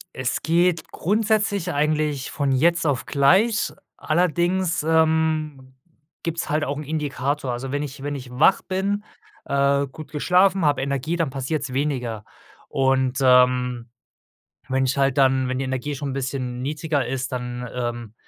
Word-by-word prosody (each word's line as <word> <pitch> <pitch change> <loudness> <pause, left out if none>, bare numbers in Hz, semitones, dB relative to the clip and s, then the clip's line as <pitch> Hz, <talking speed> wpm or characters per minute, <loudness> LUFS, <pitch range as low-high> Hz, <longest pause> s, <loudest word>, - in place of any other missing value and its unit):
Es 130 -1 -2
geht 170 0 +1
grundsätzlich 205 -2 0
eigentlich 150 -2 0
von 140 -3 -1
jetzt 165 +6 +2
auf 140 -4 0
gleich, 195 +11 +3 0.2
allerdings, 175 +1 +1
ähm, 155 -4 +1 0.5
gibt's 165 0 -3
halt 150 0 +1
auch 145 - -2
'n 150 - -5
Indikator. 145 -2 -2
Also, 130 +2 -5
wenn 145 +1 -1
ich 140 -2 -7
wenn 145 0 -3
ich 130 -2 -8
wach 130 +9 +4
bin, 200 +2 -2 0.4
äh, 140 0 +2
gut 145 +2 -11
geschlafen, 180 +4 +3
habe 145 -3 +2
Energie, 140 +4 -1
dann 165 -4 0
passiert's 135 +1 -3
weniger 125 -6 -2 0.4
und, 130 -1 +1
ähm, 125 -2 +3 0.8
wenn 130 0 +1
ich 130 +2 -1
halt 135 0 +2
dann 130 -1 +3
wenn 130 0 -2
die - - -1
Energie 130 +3 -3
schon 140 0 -4
'n - - -4
bisschen 130 -2 -3
niedriger 150 -2 -1
ist, 130 +1 -3
dann, 125 -1 -4
ähm, 120 -3 -4
140 Hz, 150 wpm, -23 LUFS, 130-160 Hz, 0.8 s, wach